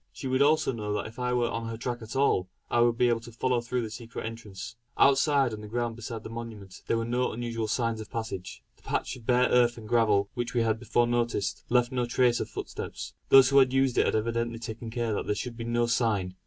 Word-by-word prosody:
She - - -9
would 130 +1 +1
also 150 +1 +4
know 105 -4 -3
that 105 - -2
if 110 +3 -9
I 125 0 0
were 120 -1 +1
on 115 0 -3
her 115 0 -5
track 120 +1 -4
at 110 +2 -8
all, 115 -9 +2 0.2
I 120 - +3
would 120 -1 +3
be 125 - +4
able 120 -1 +2
to 120 +1 -11
follow 120 +1 0
through 120 +1 -2
the 110 - -5
secret 115 0 -7
entrance. 110 -2 -7 0.2
Outside, 140 -2 +4
on 105 - -6
the 105 - -8
ground 120 +1 -2
beside 115 -1 -6
the - - -7
monument, 110 -5 -8
were 115 0 +1
no 125 +2 0
unusual 115 -1 -3
signs 115 0 -1
of 110 - -10
passage. 110 -5 -5
The - - -26
patch - - -2
of 120 -3 -14
bare 125 0 +4
earth 120 -1 +3
and 110 -2 -9
gravel, 105 -4 +2
which 120 0 -4
we 120 - +3
had 110 -1 +1
before 120 0 +2
noticed, 120 -4 -1
left 125 +1 +3
no 125 -2 -1
trace 120 0 +3
of - - -3
footsteps. - - -6 0.2
Those 135 -1 +8
who 140 0 +6
had 130 -1 +4
used 135 -2 +2
it - - +3
had - - +1
evidently 115 +1 -1
taken 115 0 -6
care 115 -1 -1
that - - -3
there 105 - +1
should 115 +3 -5
be 115 0 -6
no 120 0 +1
sign. 110 -6 0
115 Hz, 250 wpm, -28 LUFS, 110-125 Hz, 0.2 s, Those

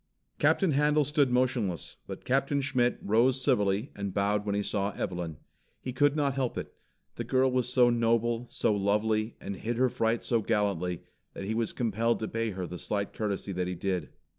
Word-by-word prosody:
Captain 190 -5 +3
Handel 150 +1 +3
stood 145 -1 +2
motionless, 125 - 0
but - - -8
Captain 135 +2 +1
Schmitt 125 -3 +1
rose 120 +5 +3
civilly 105 -2 +1
and 100 -2 -4
bowed 105 +1 +1
when 100 - 0
he 100 - 0
saw 100 0 -1
Evelyn. 85 -4 -4 0.4
He 130 - -5
could 145 +2 +3
not 145 -3 +1
help 130 -3 -2
it. - - -5 0.4
The - - -2
girl 130 0 +2
was 125 -1 0
so 125 -1 +5
noble, 115 0 +1
so 105 - +1
lovely, 110 +2 +1
and 100 - -6
hid 115 +4 -3
her 130 +1 +3
fright 115 0 0
so 115 -2 +1
gallantly, 100 -6 0 0.3
that - - -5
he 105 +3 -2
was 115 -1 0
compelled 115 0 0
to 110 - -1
pay 115 0 -1
her 95 -3 -4
the 90 0 -7
slight 100 -1 -2
courtesy 100 -2 -3
that 90 -1 -2
he 90 - -3
did. 90 -3 -2
115 Hz, 190 wpm, -29 LUFS, 100-125 Hz, 0.4 s, so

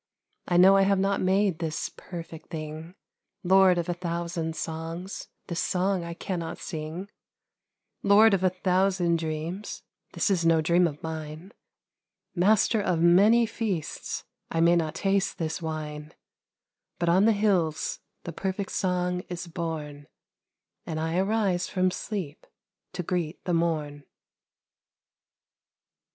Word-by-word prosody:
I 175 - +2
know 190 +2 +7
I - - +5
have 195 0 +3
not 195 +1 +1
made 190 -2 +2
this 160 -2 -2
perfect 165 -3 -9
thing, 155 +2 -7 0.5
Lord 190 0 +5
of 170 - -1
a 175 - 0
thousand 170 -2 -3
songs, 165 +4 -5 0.2
this 170 0 -4
song 185 0 0
I 170 0 -6
cannot 170 -2 -4
sing, 160 +3 -6 0.9
Lord 205 +2 +6
of 190 -1 +1
a 185 - +5
thousand 185 -2 +1
dreams, 160 +5 -4 0.3
this - - +1
is 180 -3 +1
no 165 -1 +4
dream 170 +3 +3
of 150 -2 -8
mine, 160 +3 -6 0.8
Master 210 +4 +3
of 180 -5 0
many 200 +8 +6
feasts, 205 - -3 0.3
I 165 - -1
may 170 +1 +5
not 160 -2 0
taste 195 +2 0
this 160 0 -3
wine 150 -2 -5
j - - -25 0.8
But 170 - -1
on 185 +4 +5
the 225 - +6
hills 195 -7 +1 0.2
the 170 - -6
perfect 190 +3 -3
song 180 -1 0
is 175 -1 -5
born, 160 -4 -5 0.8
And 155 -1 -4
I 160 +1 -1
arise 195 -3 +1
from 185 -1 +1
sleep 180 -7 -5 0.5
to 180 0 -3
greet 170 -1 -3
the 180 - 0
morn. 155 -4 -1
175 Hz, 135 wpm, -27 LUFS, 160-190 Hz, 0.9 s, know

